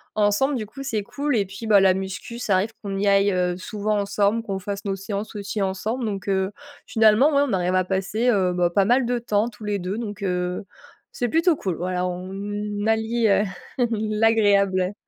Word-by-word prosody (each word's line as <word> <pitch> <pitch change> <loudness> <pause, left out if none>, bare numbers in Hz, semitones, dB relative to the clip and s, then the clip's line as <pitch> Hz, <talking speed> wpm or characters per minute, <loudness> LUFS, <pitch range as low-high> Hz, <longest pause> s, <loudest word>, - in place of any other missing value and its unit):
ensemble, 210 +7 +2
du 220 -4 -4
coup. 275 +6 -9
C'est 225 -6 -1
cool 280 +6 -2
et 205 - +2
puis, 195 +3 -8
bah, 210 -2 +6
la 190 -1 +4
musculation, 190 +5 -5
ça 230 -4 0
arrive 205 +4 0
qu'on 200 -1 -4
y 205 - +1
aille 195 -3 +2
souvent 210 +2 -2
ensemble, 205 +2 +1
qu'on 195 -3 -3
fasse 200 +1 -5
nos 195 - -1
séances 200 +2 -5
aussi 200 0 -3
ensemble. 215 +6 -2
Donc 200 -3 -4
heu, 190 0 +1 0.3
finalement, 225 +6 +4
ouais, 280 - +4
on 235 - -2
arrive 180 -1 +1
à 185 0 +2
passer, 195 +6 0
heu, 190 -6 +2
bah, 175 -1 +2
pas 190 +2 +2
mal 245 +2 +3
de 245 0 0
temps 225 -2 0
tous 215 -1 -14
les 205 -1 -1
2 185 +4 -3
donc 205 -4 -5
heu 180 -1 -2 0.5
c'est 245 - 0
plutôt 330 +3 +3
cool 190 - -3
voilà 180 0 -1
on 205 +3 -4
allie 225 +1 +1 0.5
l'agréable. 215 -5 +2
205 Hz, 195 wpm, -23 LUFS, 190-225 Hz, 0.5 s, bah